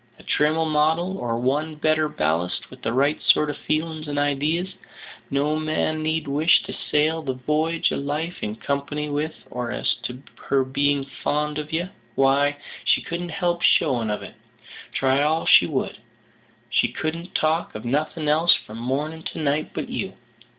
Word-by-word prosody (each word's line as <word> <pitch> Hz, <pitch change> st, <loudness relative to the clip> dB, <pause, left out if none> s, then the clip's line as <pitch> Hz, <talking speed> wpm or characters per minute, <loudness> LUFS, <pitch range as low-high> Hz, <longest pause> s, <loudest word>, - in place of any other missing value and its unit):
A -, -, -16 dB
trimmer 155 Hz, +2 st, +2 dB
model, 160 Hz, +5 st, +1 dB
or 115 Hz, -1 st, -1 dB
one 145 Hz, +6 st, 0 dB
better 155 Hz, 0 st, +2 dB
ballasted 80 Hz, -, -1 dB
with -, -, -12 dB
the 115 Hz, -, -1 dB
right 140 Hz, +5 st, +2 dB
sort 150 Hz, -1 st, +4 dB
of 145 Hz, -, -8 dB
feelin's 155 Hz, 0 st, -1 dB
and 145 Hz, 0 st, -3 dB
idees, 150 Hz, +6 st, 0 dB, 0.6 s
no 145 Hz, +2 st, +1 dB
man 155 Hz, 0 st, 0 dB
need 155 Hz, -1 st, -1 dB
wish 155 Hz, +6 st, +4 dB
to -, -, -6 dB
sail 155 Hz, +2 st, +1 dB
the 135 Hz, -4 st, -3 dB
v'y'ge 155 Hz, +5 st, +1 dB
of -, -, -1 dB
life 150 Hz, +5 st, -3 dB
in 105 Hz, 0 st, -3 dB
company 140 Hz, +4 st, -2 dB
with, 150 Hz, +2 st, -2 dB, 0.2 s
and 120 Hz, -1 st, -2 dB
as -, -, 0 dB
to 125 Hz, +2 st, -6 dB, 0.2 s
her 135 Hz, -1 st, +3 dB
being 140 Hz, +1 st, +1 dB, 0.2 s
fond 150 Hz, +1 st, 0 dB
of 150 Hz, 0 st, -6 dB
ye, 165 Hz, +2 st, 0 dB, 0.3 s
why, 140 Hz, +2 st, +3 dB, 0.3 s
she -, -, +2 dB
couldn't 175 Hz, +1 st, -4 dB
help 175 Hz, 0 st, 0 dB
showing 115 Hz, -4 st, +3 dB
of 105 Hz, -, -2 dB
it, -, -, -9 dB, 0.6 s
try 135 Hz, +1 st, +2 dB
all 155 Hz, +2 st, +2 dB
she -, -, +7 dB
would. -, -, -2 dB, 0.7 s
She -, -, +3 dB
couldn't 165 Hz, +3 st, -4 dB
talk 160 Hz, +2 st, +1 dB
of 110 Hz, +2 st, -6 dB
nothing 150 Hz, +4 st, -1 dB
else 160 Hz, +3 st, +4 dB
from 110 Hz, +2 st, -8 dB
morning 145 Hz, +6 st, -2 dB
to -, -, -9 dB
night 150 Hz, 0 st, 0 dB
but -, -, -4 dB
you. -, -, -3 dB
150 Hz, 170 wpm, -24 LUFS, 140-160 Hz, 0.7 s, she